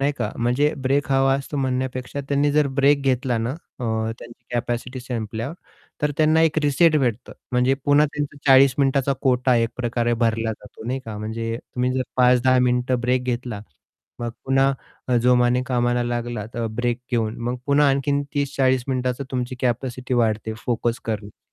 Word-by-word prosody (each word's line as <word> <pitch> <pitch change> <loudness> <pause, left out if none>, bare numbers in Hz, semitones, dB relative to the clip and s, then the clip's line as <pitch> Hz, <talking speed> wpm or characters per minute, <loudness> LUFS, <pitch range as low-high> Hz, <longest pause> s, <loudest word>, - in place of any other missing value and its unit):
नाही 140 +1 +2
का - - -1
म्हणजे 125 +6 +1
ब्रेक 135 0 +1
हवा 135 0 +4
असतो 140 +2 -4
म्हणण्यापेक्षा 130 0 -2
त्यांनी 145 +1 +2
जर 150 0 +3
ब्रेक 140 +1 +4
घेतला 130 -2 +1
ना, 115 +2 -1
अ, 140 -3 -9 0.3
त्यांची 120 0 -13
कॅपॅसिटी 120 +1 -3
संपल्यावर 115 +2 -4 0.5
तर 150 - +2
त्यांना 155 +1 +4
एक 160 -1 +3
रिसेट 155 +3 +4
भेटतो 120 -3 -2 0.2
म्हणजे 125 +2 +3
पुन्हा 145 +1 +5
त्यांचा 145 -1 -3
40 135 -1 +7
मिनिटाचा 140 0 +2
कोटा 125 -1 +3
एकप्रकारे 120 +1 0
भरला 115 0 0
जातो 105 +1 -13
नाही 130 +2 -2
का 110 -2 -6
म्हणजे 115 +1 -3
तुम्ही 125 0 -2
जर 130 - +1
5-10 125 0 +4
मिनिटं 125 0 +1
ब्रेक 125 +1 +1
घेतला, 120 -4 -3 0.6
मग 120 - -2
पुन्हा 135 +1 +3 0.4
अ, 125 - +3
जोमाने 125 0 +3
कामाला 120 -1 +1
लागला 120 -2 -3
अ, 115 -1 -2
ब्रेक 120 +2 -1
घेऊन 115 -2 0
मग 125 - -2
पुन्हा 145 0 +4
आणखीन 140 +1 +1
30-40 135 -3 +1
मिनिटाचा 130 +1 -1
तुमची 125 0 -2
कॅपॅसिटी 125 +1 -2
वाढते 110 -2 0
फोकस 120 0 -1
करण्याची 105 -2 -5
125 Hz, 160 wpm, -22 LUFS, 120-135 Hz, 0.6 s, 40